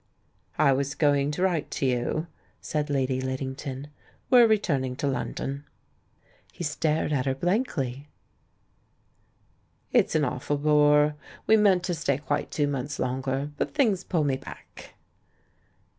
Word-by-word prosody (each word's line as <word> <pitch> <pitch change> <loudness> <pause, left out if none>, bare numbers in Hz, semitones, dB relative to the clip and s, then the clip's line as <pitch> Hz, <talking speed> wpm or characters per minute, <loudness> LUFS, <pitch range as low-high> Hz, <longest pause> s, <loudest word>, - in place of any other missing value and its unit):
"I 140 -3 +4
was 140 +1 -1
going 145 -2 +2
to 150 +5 -2
write 175 -5 0
to - - -2
you," 130 +5 0 0.3
said 150 -1 -3
Lady 130 -2 0
Lid 130 0 -3
dington; 135 +1 -6 0.4
"we're 245 -2 +8
returning 140 - 0
to 140 - -3
London." 140 +1 -3 0.9
He - - -7
stared 150 0 0
at 135 -2 0
her 135 - +1
blankly. 145 - -1 1.8
"It's - - +3
an 155 -2 +3
awful 140 +3 -2
bore; 150 0 +4 0.3
we 220 - +5
meant 200 -4 +4
to 175 - -1
stay 145 -5 0
quite 145 0 -2
two 150 - 0
months 140 0 -3
longer. 135 +3 -2
But - - -3
things 215 -11 +2
pull 165 -4 0
me 135 -2 +1
back." - - -12
145 Hz, 140 wpm, -26 LUFS, 135-160 Hz, 1.8 s, we're